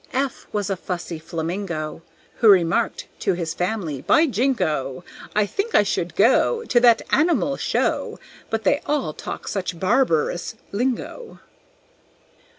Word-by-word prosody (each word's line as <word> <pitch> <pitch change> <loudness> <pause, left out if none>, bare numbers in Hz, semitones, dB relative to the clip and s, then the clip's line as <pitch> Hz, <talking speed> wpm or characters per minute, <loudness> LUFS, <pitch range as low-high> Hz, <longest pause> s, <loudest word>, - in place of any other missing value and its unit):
F 270 0 -2
was 205 -1 -2
a - - +1
fussy 175 -2 -5
Flamingo, 165 0 -4 0.4
Who 225 - +5
remarked 180 -4 +3
to 195 - +1
his 170 -2 -3
family, 180 -8 -2
"By 320 - +4
jingo! 175 - -1 0.3
I 210 -1 +3
think 400 - -3
I - - +5
would - - -3
go 470 -1 +3
To 245 - +3
that 235 -2 +5
animal 285 -2 +2
show, - - -1 0.3
But 225 0 -2
they 285 +9 +2
all 285 - 0
talk - - -7
such 180 -4 -3
barbarous 185 - +1 0.2
lingo." 255 - -3
200 Hz, 135 wpm, -22 LUFS, 170-260 Hz, 0.4 s, Who